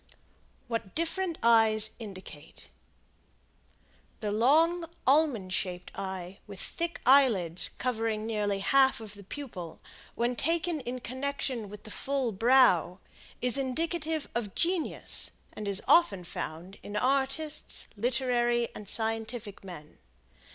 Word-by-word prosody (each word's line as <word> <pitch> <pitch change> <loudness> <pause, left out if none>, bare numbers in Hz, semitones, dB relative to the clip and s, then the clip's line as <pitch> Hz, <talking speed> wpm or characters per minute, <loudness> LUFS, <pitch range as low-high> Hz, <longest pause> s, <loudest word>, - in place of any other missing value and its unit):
WHAT 230 -5 -4
DIFFERENT 335 +1 -2
EYES 220 -2 +5
INDICATE. 185 -8 -10 1.5
The 210 -3 -2
long, 320 +10 +3 0.2
almond 260 -10 +2
shaped 180 0 -3
eye 190 0 -6
with 200 -3 -9
thick 340 - -3
eyelids 225 -11 +5
covering 225 -3 -2
nearly 205 -3 -1
half 265 +4 +4
of 215 -2 -9
the 200 -1 -11
pupil, 190 - -8 0.4
when 240 +1 0
taken 330 +4 0
in 250 -1 -5
connection 260 -3 -4
with 210 0 -11
the 215 - -10
full 270 -1 -1
brow, 200 -5 +4 0.4
is 250 +2 +2
indicative 315 +3 -2
of 220 -5 -3
genius, 345 -1 0 0.2
and 210 - -6
is 200 0 +2
often 205 - +4
found 175 +2 -7
in 205 - -8
artists, 275 +6 0
literary 240 +1 +1
and 205 -2 -9
scientific 225 -2 -2
men. 175 -6 -11
230 Hz, 115 wpm, -29 LUFS, 200-275 Hz, 1.5 s, EYES